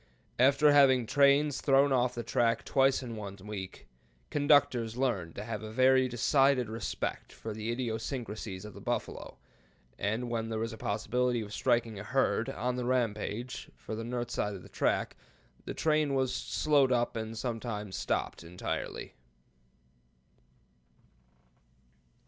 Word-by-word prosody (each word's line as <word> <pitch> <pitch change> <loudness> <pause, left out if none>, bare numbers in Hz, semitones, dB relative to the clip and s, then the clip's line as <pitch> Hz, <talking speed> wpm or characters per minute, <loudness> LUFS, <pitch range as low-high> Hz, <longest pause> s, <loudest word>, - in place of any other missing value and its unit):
After 140 +3 +5
having 135 -4 +5
trains 140 +3 +3
thrown 140 0 +4
off 125 -1 +2
the 120 - -3
track 115 0 +1
twice 135 0 +3
in 120 -2 -6
one 100 -2 -7
week, 100 -3 -7 0.5
conductors 130 -6 +3
learned 105 -11 -1
to 100 - -5
have 110 -1 -4
a 110 - -7
very 130 +2 +4
decided 130 0 +2
respect 110 -2 -4
for 110 - -7
the 110 +2 -3
idiosyncrasies 110 -4 -4
of 105 - -9
the - - -11
buffalo, - - -4 0.6
and 110 +5 -1
when 115 -1 -2
there 110 - -2
was 115 +1 -2
a - - -8
possibility 120 +4 0
of 105 -1 -7
striking 120 -4 +1
a - - -6
herd 130 -1 +1
'on 125 0 -2
the 125 - -2
rampage' 120 0 -2
for - - -8
the 110 +1 -4
north 120 0 -3
side 105 -1 -1
of 95 - -10
the - - -14
track, - - 0 0.5
the - - -4
train 155 -3 +2
was 130 -1 +1
slowed 140 +1 +2
up 120 -1 +1
and 110 0 -4
sometimes 110 -4 -4
stopped - - -2
entirely." 90 +2 -5
120 Hz, 145 wpm, -31 LUFS, 110-130 Hz, 0.6 s, After